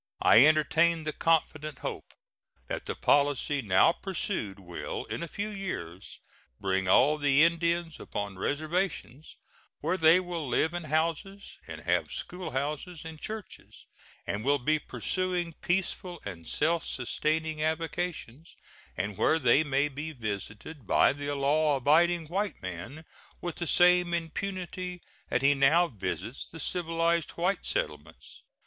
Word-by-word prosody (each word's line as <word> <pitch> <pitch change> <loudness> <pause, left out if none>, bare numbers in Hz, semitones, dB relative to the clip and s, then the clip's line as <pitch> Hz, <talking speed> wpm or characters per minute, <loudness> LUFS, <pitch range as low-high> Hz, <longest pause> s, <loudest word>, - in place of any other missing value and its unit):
I 120 - +8
entertain 160 +2 +3
the 155 0 -3
confident 155 -2 0
hope - - -6 0.5
that - - -5
the - - -3
policy 145 0 +2
now 95 +6 +5
pursued 175 - -3
will 90 -3 -6
in - - -5
a 170 - -3
few 205 +6 -4
years 175 - -6 0.4
bring 95 -1 0
all 145 +10 +5
the 145 0 +5
Indians 170 0 +1
upon 100 -2 -5
reservations, 155 - -2 0.4
where 165 +5 0
they 160 +1 +6
will 175 -5 -4
live 155 +7 +1
in 175 -2 -4
houses, 165 +6 -2
and - - -8
have - - 0
schoolhouses 155 0 -4
and 160 -1 -9
churches, 215 -2 -8 0.4
and 105 +1 -3
will 145 +2 +3
be 155 +4 +1
pursuing 180 0 -2
peaceful 180 -1 -1
and 85 -5 -7
self 165 +2 +1
sustaining 155 +4 -2
avocations, 160 -2 -3 0.4
and 105 -1 -3
where 160 - +4
they 140 +1 +4
may 140 -1 +1
be 150 +3 -6
visited 110 - -6
by - - +4
the 145 0 -4
law 145 +2 +2
abiding 165 +5 +3
white 190 +3 -2
man 95 - -7 0.3
with 175 -1 -5
the 170 - -3
same 180 0 +4
impunity 180 +1 -4 0.3
that 125 - 0
he 140 +1 +6
now 145 +6 +4
visits 110 - -5
the 165 - -11
civilized 165 0 0
white 180 +4 0
settlements. - - -5
155 Hz, 135 wpm, -29 LUFS, 140-175 Hz, 0.5 s, I